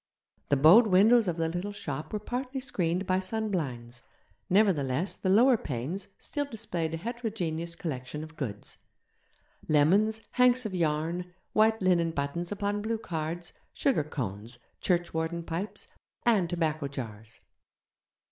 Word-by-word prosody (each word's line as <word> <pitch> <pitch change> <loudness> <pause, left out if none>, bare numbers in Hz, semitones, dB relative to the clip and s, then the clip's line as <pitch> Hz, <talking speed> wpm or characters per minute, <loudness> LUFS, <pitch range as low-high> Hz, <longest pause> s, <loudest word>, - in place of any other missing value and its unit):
The 140 - +4
bowed 175 - +8
windows 215 +4 +5
of 175 -1 -1
the 165 -1 +1
little 175 +5 -3
shop 150 -7 -5
were 215 - -1
partly 250 +5 -4
screened 185 -8 -1
by 185 0 +2
sunblinds; 160 - -3 0.5
nevertheless 180 -6 +2
the 190 - -3
lower 240 +6 +6
panes 155 - -4
still 290 -1 -3
displayed 180 - -3
a - - -4
heterogeneous 180 -6 -3
collection 150 -2 -5
of 160 0 -11
goods 110 -9 -6 0.9
lemons, 195 +9 +3
hanks 250 0 +4
of 210 - -3
yarn, 170 +1 -1 0.2
white 220 -1 +3
linen 175 -3 +3
buttons 165 +3 -3
upon 205 0 -1
blue 225 +2 -1
cards, 170 -3 -4 0.2
sugar 265 - +1
cones, 115 -5 -5 0.2
churchwarden 170 -1 0
pipes, 170 +5 -5 0.4
and 205 -8 +3
tobacco 155 -4 -1
jars. 115 -5 -8
175 Hz, 130 wpm, -29 LUFS, 155-210 Hz, 0.9 s, bowed